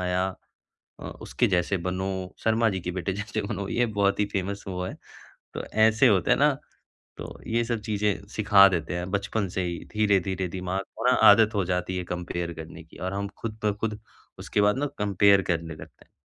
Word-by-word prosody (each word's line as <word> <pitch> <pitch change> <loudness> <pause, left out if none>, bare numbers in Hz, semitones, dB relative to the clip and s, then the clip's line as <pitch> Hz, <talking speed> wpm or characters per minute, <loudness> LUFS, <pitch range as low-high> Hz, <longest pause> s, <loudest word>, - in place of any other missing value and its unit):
आया। 90 0 0 0.8
अ, - - -10 0.2
उसके - - 0
जैसे 90 +1 +1
बनो, 95 +1 -3
शर्मा 115 +1 +3
जी 95 - -3
के 90 - -4
बेटे 95 +1 -2
जैसे 105 +2 -3
बनो। 100 -2 -4
ये 120 +3 +1
बहुत 100 -1 +1
ही - - +4
फेमस 100 +1 -3
वो 90 -1 -3
है। - - -5 0.6
तो - - -4
ऐसे 110 +3 +3
होता 95 -4 +2
है - - +5
ना - - +5 0.7
तो - - -8
ये 115 +1 +1
सब 115 -2 -2
चीजें 105 -2 -1
सिखा 100 -2 +7
देते 85 -1 -2
हैं 90 +1 -4
बचपन 100 0 -1
से 95 +1 -2
ही 85 -1 -3 0.2
धीरे-धीरे 95 -3 +1
दिमाग 95 +1 -3
को - - -5
ना - - +5 0.2
आदत 110 -1 +5
हो 100 -3 +1
जाती 90 0 -2
है 90 - -2
कम्पेयर 85 -1 -4
करने 80 +1 -10
की 80 - -17
और 95 +1 -4
हम 100 0 -2
खुद 110 -1 -5
ब 105 -1 +1
खुद 110 -1 -2 0.4
उसके 105 - 0
बाद 105 +4 +3
ना 145 - 0
कम्पेयर 100 -1 +4
करने 80 -1 -2
लगते 80 - -14
हैं। - - -38
100 Hz, 205 wpm, -26 LUFS, 90-105 Hz, 0.8 s, सिखा